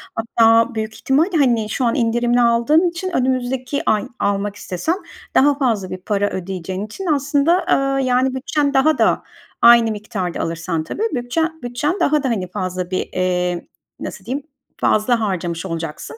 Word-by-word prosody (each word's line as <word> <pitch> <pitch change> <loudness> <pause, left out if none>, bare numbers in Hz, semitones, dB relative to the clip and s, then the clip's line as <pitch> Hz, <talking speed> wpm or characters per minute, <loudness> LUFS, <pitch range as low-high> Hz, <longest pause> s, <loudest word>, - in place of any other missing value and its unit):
Hatta 230 +1 +3
büyük 220 0 -3
ihtimalle, 320 +6 +1
hani, 235 -6 +2
şu 250 +4 -1
an 235 - +1
indirimli 240 0 +2
aldığın 240 +9 +3
için 345 +2 -4
önümüzdeki 255 +1 -1
ay 215 +3 +1
almak 200 0 -1
istesen 205 - -2 0.4
daha 285 +1 +4
fazla 225 -9 0
bir 185 - -5
para 205 +2 -1
ödeyeceğin 185 +1 -5
için 300 - -8
aslında, 295 +3 +2
eee, 275 0 +2
yani, 255 +1 +1
bütçen 285 +2 0
daha 305 +4 +3
da, - - +2 0.4
aynı 235 -1 +7
miktarda 205 -4 -4
alırsan 165 0 -2
tabii, 420 - -4
bütçen 320 +6 -2
bütçen 245 +10 -2
daha 300 -1 +2
da, 265 - 0
hani, 195 -6 -1
fazla 185 -2 -4
bir, 185 - -2
eee, 180 -1 -1 0.3
nasıl 190 -2 -7
diyeyim, 270 +6 -4 0.3
fazla 225 +3 +2
harcamış 180 -5 -2
olacaksın. 165 - -5
235 Hz, 155 wpm, -19 LUFS, 195-275 Hz, 0.4 s, aynı